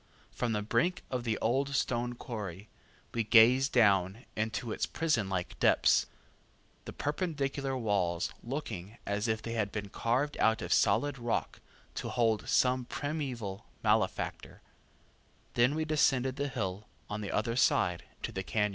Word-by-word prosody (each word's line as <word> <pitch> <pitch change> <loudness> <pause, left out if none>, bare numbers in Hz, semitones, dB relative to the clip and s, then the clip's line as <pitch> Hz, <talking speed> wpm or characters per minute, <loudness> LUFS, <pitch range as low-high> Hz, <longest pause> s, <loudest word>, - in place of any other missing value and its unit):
From 120 -2 -1
the 105 -1 -1
brink 175 - +1
of 125 -2 -2
the 110 -2 0
old 135 +4 +1
stone 120 -2 0
quarry, 105 -5 -6 0.4
we 115 - +1
gaze 120 +5 +6
down 100 -2 +3
into 110 +2 -2
its - - -1
prisonlike 100 - -1
depths, - - +4 0.8
the - - -6
perpendicular 140 -4 -2
walls 95 -7 0
looking 115 -6 -5
as 100 +2 -1
if 110 0 -1
they 115 - -4
had 105 -3 -1
been 105 -2 -4
carved 130 +8 0
out 110 -2 +3
of 85 - +1
solid 145 -2 +2
rock 120 -1 -2 0.3
to - - -4
hold 115 -3 +1
some 125 0 +3
primeval 130 -10 -4 0.2
malefactor; - - 0 0.9
then 125 +5 +3
we 160 0 -1
descend 145 -4 +3
the 135 +2 -2
hill 105 -6 -4 0.2
on 105 0 -4
the 100 - -4
other 115 +2 0
side 90 -8 +2 0.2
to - - -2
the 95 - -4
cañon. 105 +2 +1
115 Hz, 145 wpm, -31 LUFS, 105-135 Hz, 0.9 s, gaze